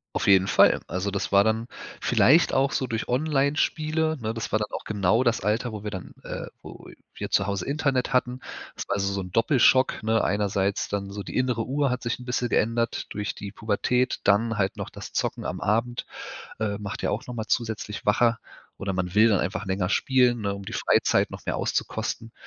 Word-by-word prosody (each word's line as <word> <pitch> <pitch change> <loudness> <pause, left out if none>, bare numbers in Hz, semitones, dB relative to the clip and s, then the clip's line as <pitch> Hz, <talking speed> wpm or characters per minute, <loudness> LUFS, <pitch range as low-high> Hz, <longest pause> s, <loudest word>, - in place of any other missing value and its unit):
Auf - - 0
jeden 95 -1 +6
Fall. - - +5
Also, 95 +2 -2
das 100 0 -3
war 100 0 +7
dann 110 +2 0 0.4
vielleicht 155 +8 +4
auch 135 +1 +2
so 130 - 0
durch 115 -2 -3
Onlinespiele, 155 +3 +1
ne? 110 0 -3
Das 115 -1 -5
war 110 - +3
dann 105 -1 -2
auch - - -6
genau 105 +3 +2
das 120 -2 +2
Alter, 110 +4 0
wo 105 -1 -7
wir 105 - -3
dann, 95 -3 -7
äh - - -6
wo - - -11 0.2
wir - - -5
zu 95 - +2
Hause 100 -3 -2
Internet 140 -3 0
hatten. 125 0 +1 0.4
Das - - -5
war 100 - 0
also 100 0 0
so 100 0 -2
'n 90 -1 -9
Doppelschock, 130 +3 +3
ne? 110 +1 +2
Einerseits 100 -1 0
dann 100 -1 -3
so 100 - -5
die - - -9
innere 125 -3 +1
Uhr 140 +3 0
hat 125 -1 -2
sich 120 0 -2
'n 125 - -11
bisschen 125 -1 -1
geändert 115 +1 0
durch 105 -1 -4
die 100 -1 -7
Pubertät, 125 +4 0
dann 110 +3 +2
halt 95 -1 0
noch - - -5
das - - -10
Zocken - - -1
am - - -4
Abend. 115 +4 0 0.5
Äh, 105 -2 -1
macht 105 -1 -6
ja - - +1
auch 105 - -3
noch 125 - -6
mal 110 -1 -4
zusätzlich 110 -3 -2
wacher 115 +2 +3 0.4
oder 95 0 -3
man 90 0 -2
will 110 +2 +6
dann 100 -4 +3
einfach 100 +3 -3
länger 95 -1 -1
spielen, 125 0 +3
ne? 100 -1 -1
Um 100 0 -8
die - - -7
Freizeit - - +2
noch - - -9
mehr - - -1
auszukosten. 115 0 -2
110 Hz, 215 wpm, -25 LUFS, 100-125 Hz, 0.5 s, war